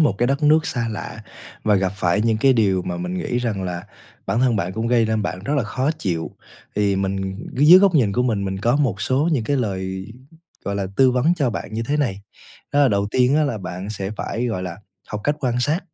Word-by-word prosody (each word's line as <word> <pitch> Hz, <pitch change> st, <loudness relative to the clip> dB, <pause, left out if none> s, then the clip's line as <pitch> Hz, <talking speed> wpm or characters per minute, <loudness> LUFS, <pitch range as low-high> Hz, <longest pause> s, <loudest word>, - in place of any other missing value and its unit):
một 150 Hz, -10 st, +4 dB
cái 120 Hz, -, +2 dB
đất 140 Hz, +3 st, 0 dB
nước 155 Hz, +1 st, +4 dB
xa 120 Hz, -2 st, -2 dB
lạ 110 Hz, -, -6 dB, 0.5 s
và 105 Hz, -1 st, +4 dB
gặp 95 Hz, -1 st, +1 dB
phải 90 Hz, +1 st, +1 dB
những 115 Hz, -1 st, +2 dB
cái 135 Hz, +4 st, +4 dB
điều 100 Hz, -6 st, +2 dB
mà 90 Hz, 0 st, -4 dB
mình 90 Hz, +1 st, -4 dB
nghĩ 120 Hz, -, -2 dB
rằng 110 Hz, -6 st, -2 dB
là 90 Hz, +1 st, -5 dB, 0.4 s
bản 115 Hz, -, 0 dB
thân 125 Hz, -4 st, +3 dB
bạn 90 Hz, -1 st, -2 dB
cũng 110 Hz, +2 st, -2 dB
gây 115 Hz, -2 st, +3 dB
nên 110 Hz, -1 st, 0 dB
bạn 95 Hz, -2 st, -3 dB
rất 145 Hz, -, -1 dB
là 135 Hz, -, +2 dB
khó 130 Hz, +7 st, -1 dB
chịu. 85 Hz, -4 st, -2 dB, 0.5 s
Thì 100 Hz, -2 st, +2 dB
mình 95 Hz, 0 st, -2 dB, 0.2 s
dưới 150 Hz, +7 st, +8 dB
góc 195 Hz, -2 st, +4 dB
nhìn 115 Hz, -10 st, +3 dB
của 125 Hz, -, +1 dB
mình, 110 Hz, -5 st, 0 dB
mình 95 Hz, 0 st, -3 dB
có 120 Hz, +6 st, +2 dB
một 120 Hz, -9 st, 0 dB
số 130 Hz, +7 st, +1 dB
những 125 Hz, -7 st, 0 dB
cái 140 Hz, +4 st, 0 dB
lời, 95 Hz, -4 st, -3 dB, 0.6 s
gọi 100 Hz, -, -2 dB
là, 100 Hz, -1 st, -2 dB
tư 130 Hz, -1 st, +5 dB
vấn 135 Hz, +8 st, +2 dB
cho 140 Hz, -7 st, 0 dB
bạn 110 Hz, -, -6 dB
như 115 Hz, -, -1 dB
thế 145 Hz, +6 st, -1 dB
này. 100 Hz, -9 st, -1 dB, 0.5 s
Đó 145 Hz, -, +3 dB
là 140 Hz, -, +5 dB
đầu 100 Hz, -2 st, +1 dB
tiên 130 Hz, +3 st, +3 dB
á 155 Hz, -, +3 dB
là 120 Hz, -7 st, -2 dB
bạn 90 Hz, +2 st, -6 dB
sẽ 100 Hz, -2 st, -4 dB
phải, 120 Hz, +2 st, -2 dB
gọi 95 Hz, -6 st, -2 dB
là, 90 Hz, -2 st, -5 dB, 0.3 s
học 105 Hz, -, -4 dB
cách 145 Hz, 0 st, +1 dB
quan 125 Hz, -2 st, 0 dB
sát. 155 Hz, +8 st, +1 dB
110 Hz, 250 wpm, -21 LUFS, 95-130 Hz, 0.6 s, dưới